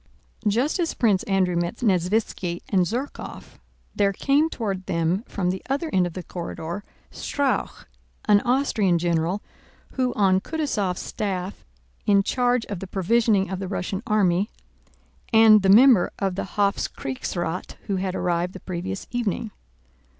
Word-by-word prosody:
Just 245 - +1
as 335 -2 -1
Prince 210 -6 +2
Andrew 190 -3 +1
met 170 +4 -1
Nesvítski 185 -4 0
and 185 -3 +2
Zherkóv, 250 +8 -6 0.4
there 200 -1 +3
came 290 +9 +2
toward 195 -9 -4
them 170 +5 0
from 180 -2 -1
the 190 - -5
other 285 +4 -1
end 185 -1 +3
of 175 - -8
the 185 - -6
corridor, 170 +2 -6 0.3
Strauch, 285 -2 -2 0.4
an 205 -1 +5
Austrian 240 -8 +2
general 170 +3 0 0.5
who 255 -1 0
was 250 - -5
on 190 -2 +4
Kutúzov's 215 - -2
staff 195 -2 -4 0.4
in 200 -1 +5
charge 245 +1 +1
of 200 -4 -5
the 195 - -7
provisioning 195 0 +2
of 190 - -3
the 195 - -4
Russian 190 0 -3
army, 200 -1 +2 0.8
and 220 -2 +7
the 190 - +2
member 225 -2 +7
of 195 -2 -1
the 190 - -3
Hofkriegsrath 180 -3 -2
who 195 - -1
had 185 0 -2
arrived 175 +1 -1
the 190 - -8
previous 185 +2 -5
evening. 230 -2 -2
195 Hz, 145 wpm, -24 LUFS, 180-225 Hz, 0.8 s, and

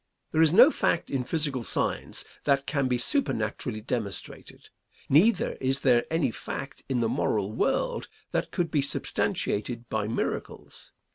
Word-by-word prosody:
There 155 - +2
is 160 -2 +5
no 245 - +8
fact 170 - 0
in 135 -2 0
physical 140 -4 -1
science - - -1 0.2
that 140 -1 +2
can 140 -1 0
be 125 -1 +1
supernaturally 115 - -1
demonstrated. 110 -4 -5 0.4
Neither 190 +8 +4
is 135 +1 +1
there 120 -3 +4
any 160 -6 +1
fact 140 +5 -6
in 125 -3 +1
the 115 - +2
moral 105 -2 0
world - - 0 0.2
that - - -1
could 170 -2 -2
be 150 - +2
substantiated 120 -3 -1
by 110 -1 -1
miracles. 115 - -5
130 Hz, 145 wpm, -27 LUFS, 115-155 Hz, 0.4 s, no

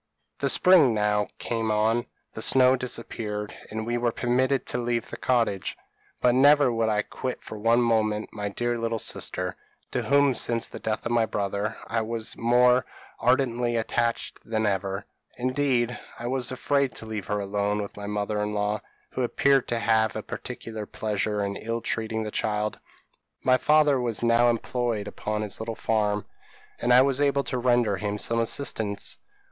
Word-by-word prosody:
p> - - -1
"The - - +3
spring 165 -11 +6
now 105 -1 +1
came 115 -1 -2
on; 110 +2 +1 0.3
the 110 - -6
snow 130 +2 +5
disappeared, 110 -4 -4 0.2
and 110 0 -4
we 120 +1 -1
were 120 -1 +1
permitted 130 +3 +1
to 125 - -3
leave 120 -1 -1
the - - -4
cottage; 115 -7 0 0.4
but 125 - +4
never 140 0 +5
would 115 -1 +1
I 105 -1 +1
quit 130 +4 -5
for - - -8
one 115 +3 +3
moment 110 -2 0
my 105 -1 -3
dear 120 +3 -2
little 115 0 -1
sister, 90 -3 -3 0.4
to - - 0
whom 140 -1 +3
since 115 -1 0
the - - -9
death 110 -1 -3
of 120 - -1
my 115 -1 +3
brother, 100 +1 -2
I 115 0 -1
was 115 0 -1
more 125 +2 +4 0.4
ardently 120 -1 +2
attached 115 +1 -1
than 110 -1 -1
ever; 95 0 -1 0.3
indeed, 125 -1 0 0.2
I 120 - -7
was 125 0 -1
afraid 140 +1 0
to - - -5
leave 110 -3 -5
her 105 0 -1
alone 100 +1 -1
with 100 -1 -5
my 100 0 -6
mother 105 0 -1
in 105 0 -2
law, 105 0 -1 0.3
who - - -3
appeared 135 +2 +2
to 120 - 0
have 110 -1 +2
a - - -4
particular 110 -2 -7
pleasure 105 -1 -2
in 100 0 -3
ill 115 +1 -3
treating 110 0 -2
the 105 - -5
child. 105 0 -1 0.6
My 130 0 +4
father 150 -2 +4
was 120 -2 -1
now 120 +1 +4
employed 115 -2 -1
upon 105 0 -3
his 105 - -4
little 110 0 -4
farm, 105 -2 0 0.5
and 120 - +1
I 125 +1 +8
was 140 0 +1
able 140 -1 +2
to 130 - -3
render 120 -5 +2
him 105 +1 -2
some 115 +2 0
assistance. 110 -4 -1
115 Hz, 175 wpm, -26 LUFS, 105-125 Hz, 0.6 s, I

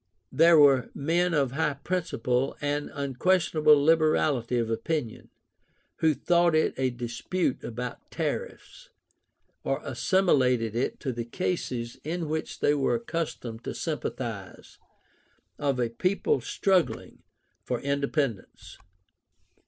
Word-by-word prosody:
There 165 +1 +6
were 135 -4 +5
men 170 +4 +1
of 140 -4 +1
high 150 0 0
principle 135 -5 -1
and 145 0 -2
unquestionable 150 +2 +3
liberality 155 -6 +2
of 115 -1 -1
opinion, 125 0 -3 0.7
who 160 -2 +2
thought 170 0 +3
it 155 - +2
a 130 -1 0
dispute 125 +6 -3
about 125 +1 -6
tariffs, - - -5 0.7
or - - -1
assimilated 130 - +2
it 120 - -1
to 130 -3 -2
the 115 0 -3
cases 120 -4 -3
in 165 +1 -3
which 155 +1 -4
they 145 - +4
were 140 -2 +1
accustomed 165 - -4
to - - -5
sympathize, - - -5 0.8
of 140 -3 0
a 120 -2 +1
people 185 - 0
struggling 190 -3 0 0.4
for 125 -2 -2
independence. 140 -5 -3
145 Hz, 115 wpm, -27 LUFS, 125-165 Hz, 0.8 s, There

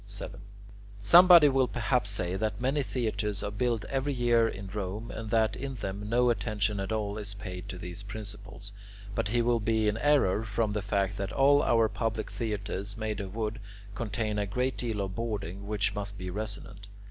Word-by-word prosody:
7. 100 -1 -7 0.6
Somebody 170 - +9
will 135 -2 +3
perhaps 120 -2 0
say 90 -3 -2
that 105 +1 -2
many 135 +4 +1
theatres 105 -6 -2
are 105 - -2
built 115 +1 0
every 135 +1 -1
year 120 -2 +3
in 100 -2 -6
Rome, 100 +3 -4
and 110 -1 -6
that 110 -1 +2
in 135 0 -5
them 100 -1 -5
no 120 +1 +4
attention 105 -3 -1
at 95 +2 -3
all 105 -1 -2
is 105 -1 -6
paid 95 -3 -7
to 90 - -5
these 90 +1 -7
principles; 100 -1 -8 0.4
but 115 0 -1
he 120 +3 +1
will 120 0 +2
be 110 0 +1
in 105 +1 +1
error, 125 -8 +3
from 110 -1 -1
the 105 - -1
fact 100 0 0
that 100 +1 -3
all 140 +1 +5
our 115 -1 +4
public 110 +2 -3
theatres 105 -2 -3
made 110 -1 -3
of 100 0 -6
wood 110 0 -2 0.3
contain 105 -1 -2
a 100 - -1
great 125 +6 -1
deal 115 -4 -2
of 95 -1 -3
boarding, 100 -3 -4
which 105 -1 0
must 100 0 -4
be 90 -1 -5
resonant. 100 0 -6
105 Hz, 190 wpm, -29 LUFS, 100-115 Hz, 0.6 s, Somebody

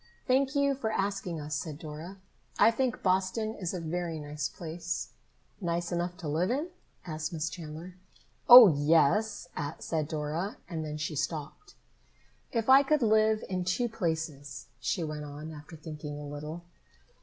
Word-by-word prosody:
"Thank 270 +2 +2
you 280 0 +3
for 240 -5 -2
asking 195 -5 -2
us," 150 0 -4
said 150 0 -4
Dora. 160 +5 -8 0.4
"I 225 - +6
think 250 +1 -1
Boston 190 +4 +1
is 180 -6 -3
a 185 - -4
very 165 0 -3
nice 150 -1 -3
place." 170 +1 -5 0.5
"Nice 170 -1 -1
enough 175 +1 -2
to 175 -4 -6
live 165 +6 +1
in?" 290 +8 -1 0.4
asked 155 -2 -4
Miss 160 -1 -2
Chandler. 170 +2 -8 0.5
"Oh, 245 -2 +13
yes," 165 +7 +2 0.3
said 155 -3 -2
Dora, 160 - -3
and 160 -3 -4
then 150 -1 -4
she 155 +1 -3
stopped. 155 - -4 0.8
"If 230 -2 -1
I 265 +1 +9
could 285 -1 +2
live 215 0 +3
in 185 -1 -2
two 185 +7 0
places," 160 - -4
she 175 - -1
went 155 -1 -4
on, 150 +2 -8
after 150 +1 -10
thinking 150 -1 -7
a 150 - -7
little. 150 +4 -6
170 Hz, 155 wpm, -30 LUFS, 155-215 Hz, 0.8 s, Oh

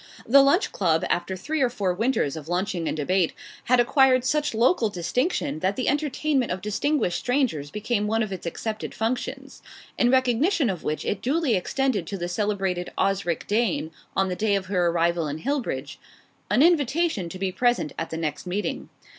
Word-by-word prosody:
The 275 +4 +7
Lunch 280 +8 +3
Club, 165 -4 +1
after 185 +2 -1
three 310 - -2
or 255 - +3
four 200 -6 -1
winters 220 - 0
of 155 0 -8
lunching 175 -2 -1
and - - -2
debate, 175 +3 +1 0.3
had 250 +1 +4
acquired 255 0 +4
such 300 -2 0
local 235 0 +3
distinction 205 - -1
that 190 +4 0
the 255 - -2
entertainment 290 -2 0
of 180 - -2
distinguished 210 - 0
strangers 245 - 0
became 210 +2 -1
one 225 +1 +1
of 205 -3 -4
its 180 -2 -6
accepted 215 +5 -4
functions; 255 +4 -3 0.4
in 245 - +4
recognition 260 - +2
of 180 -4 -7
which 155 - -3
it 200 - -2
duly 285 0 +1
extended 210 -1 0
to 200 - -4
the 175 -1 -3
celebrated 190 -2 -1
"Osric 195 -4 0
Dane," 205 -7 0 0.3
on 195 - +3
the 180 - -2
day 210 +1 +1
of 195 -1 -2
her 185 -2 +1
arrival 170 -1 +1
in 145 +1 -4
Hillbridge, 160 - -3 0.5
an 225 +8 +4
invitation 310 - +2
to 185 - -7
be 190 0 -1
present 240 -7 +1
at 165 - -3
the 160 - -4
next 160 +2 -3
meeting. 195 +4 -3
210 Hz, 180 wpm, -25 LUFS, 180-260 Hz, 0.5 s, The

